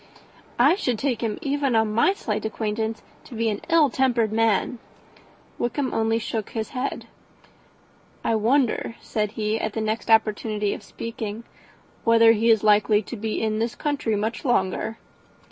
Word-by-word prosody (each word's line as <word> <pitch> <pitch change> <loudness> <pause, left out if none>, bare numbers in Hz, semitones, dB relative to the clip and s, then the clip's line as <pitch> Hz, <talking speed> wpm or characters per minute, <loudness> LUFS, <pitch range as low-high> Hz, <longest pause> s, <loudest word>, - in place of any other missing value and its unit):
"I 270 +7 +5
should 250 - -1
take 250 -2 -1
him, 225 -3 -2
even 280 -3 0
on 220 -1 +2
my 235 - +4
slight 215 - -3
acquaintance, 220 0 -3 0.2
to 250 - -10
be 225 0 0
an 205 -1 -3
ill 320 -5 +4
tempered 240 -5 +1
man." 225 +2 +1 0.8
Wickham 255 +3 -1
only 225 0 +1
shook 225 -1 -3
his 220 -1 -4
head. 265 +1 -4 1.2
"I - - +1
wonder," 230 +1 +1
said 210 -1 -2
he, 215 0 -1
at 220 -2 -3
the - - -3
next 220 +1 -2
opportunity 215 -1 +2
of - - -7
speaking, 225 -1 -6 0.6
"whether 230 0 +6
he 225 +1 +2
is 220 -2 +4
likely 210 0 +4
to 240 - -7
be 220 0 -3
in 215 0 0
this 230 +1 -1
country 285 -7 -1
much 220 +3 -2
longer." 220 -3 0
225 Hz, 160 wpm, -24 LUFS, 215-240 Hz, 1.2 s, whether